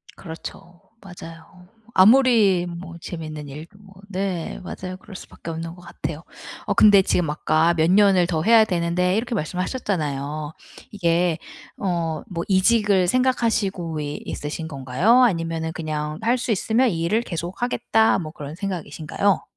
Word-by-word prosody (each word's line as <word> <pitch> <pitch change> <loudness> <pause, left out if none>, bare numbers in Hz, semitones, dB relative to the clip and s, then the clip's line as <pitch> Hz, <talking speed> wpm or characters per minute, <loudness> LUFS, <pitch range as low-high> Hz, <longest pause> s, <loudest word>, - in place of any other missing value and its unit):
그렇죠. 170 0 -10 0.2
맞아요. 175 -1 -12 0.3
아무리 210 -4 +5
뭐 170 0 -8
재밌는 155 -3 -7
일도 155 +8 -10
뭐 195 -1 -17 0.2
네 185 -3 -3
맞아요. 185 0 -6
그럴 195 0 -13
수밖에 170 - -10
없는 165 +1 -5
것 180 - -15
같아요. 165 -3 -6 0.5
어 - - +1
근데 205 -2 +7
지금 175 -4 0
아까 155 +2 +2
"몇 160 0 +2
년을 190 -3 +5
더 160 -3 -1
해야 225 +1 +6
되는데." 180 0 0
이렇게 240 +1 -2
말씀을 180 +2 -2
하셨잖아요. 150 - -3 0.4
이게 175 -3 +1 0.4
어 175 -4 -1 0.3
뭐 170 -2 -3
이직을 195 -1 +3
생각하시고 215 -9 0
이 145 0 -4
있으신 155 +2 -5
건가요? 155 - +3
아니면은 165 -6 0
그냥 155 -1 -4
'할 240 +3 +2
수 245 -1 -2
있으면 225 +5 +2
이 165 -3 -3
일을 215 +7 +1
계속하겠다.' 220 +5 0
뭐 155 -3 -6
그런 145 -2 -8
생각이신가요? 180 0 -2
175 Hz, 320 characters per minute, -22 LUFS, 160-200 Hz, 0.5 s, 근데